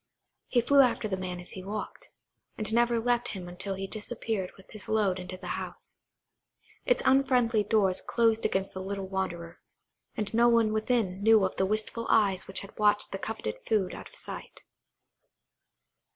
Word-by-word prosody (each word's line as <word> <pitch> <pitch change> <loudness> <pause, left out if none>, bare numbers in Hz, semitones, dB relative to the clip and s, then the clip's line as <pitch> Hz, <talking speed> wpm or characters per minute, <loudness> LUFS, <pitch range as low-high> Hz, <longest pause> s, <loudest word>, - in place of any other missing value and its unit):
He 245 - +3
flew 280 +4 +4
after 245 -4 +2
the 195 - -1
man 185 -1 -5
as 180 - -9
he 185 - -8
walked, 210 +2 -6 0.5
and 215 0 -1
never 235 0 +3
left 240 +1 +1
him 180 -1 -7
until 190 +2 -5
he 195 +1 -4
disappeared 215 -2 -4
with 190 - -18
his 215 -2 -8
load 205 -4 +2
into 185 0 -6
the 185 - -11 0.2
house. - - -9 0.9
Its - - +3
unfriendly 250 -5 +3
doors 200 -3 +2
closed 225 -1 +2
against 190 0 0
the 190 - -5
little 195 0 -4
wanderer, 175 -3 -4 0.6
and 210 0 -2
no 235 +1 +5
one 230 -2 +3
within 215 -4 0
knew 220 -1 +6
of 190 - -3
the 190 - +2
wistful 215 +2 -1
eyes 195 -4 +3
which 195 - -3
had 200 - -12
watched 210 0 +3
the 195 - -4
coveted 205 - -4
food 205 -5 +1
out - - -9
of - - -16
sight. - - -8
210 Hz, 175 wpm, -29 LUFS, 190-230 Hz, 0.9 s, knew